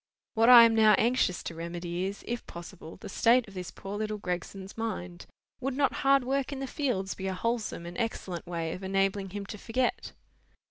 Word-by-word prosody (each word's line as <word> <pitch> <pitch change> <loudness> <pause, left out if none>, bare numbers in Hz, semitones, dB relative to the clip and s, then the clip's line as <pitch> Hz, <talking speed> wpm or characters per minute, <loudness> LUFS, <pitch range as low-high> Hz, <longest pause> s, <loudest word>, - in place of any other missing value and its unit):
What 225 +1 +4
I 240 -2 +11
am 230 -1 +5
now 220 -1 +6
anxious 230 -6 +1
to - - -5
remedy 170 +2 -4
is, 195 +1 -5
if 240 0 -4
possible, 170 -1 -10
the - - -10
state 235 +4 +3
of 200 - -13
this 180 -2 -6
poor 200 +1 -7
little 215 0 -2
Gregson's 190 +1 -5
mind. 180 -6 -5 0.3
Would 265 0 -3
not 280 -2 +2
hard 275 -1 +4
work 270 +2 -1
in 280 - -4
the 270 - -3
fields 245 -9 -2
be 190 - -5
a 190 - -2
wholesome 230 -5 -2
and 175 +1 -8
excellent 190 -7 -3
way 165 -2 -3
of 185 - -7
enabling 195 0 0
him 200 +1 -6
to 210 +1 -8
forget?" 245 +4 -1
200 Hz, 200 wpm, -29 LUFS, 180-235 Hz, 0.3 s, I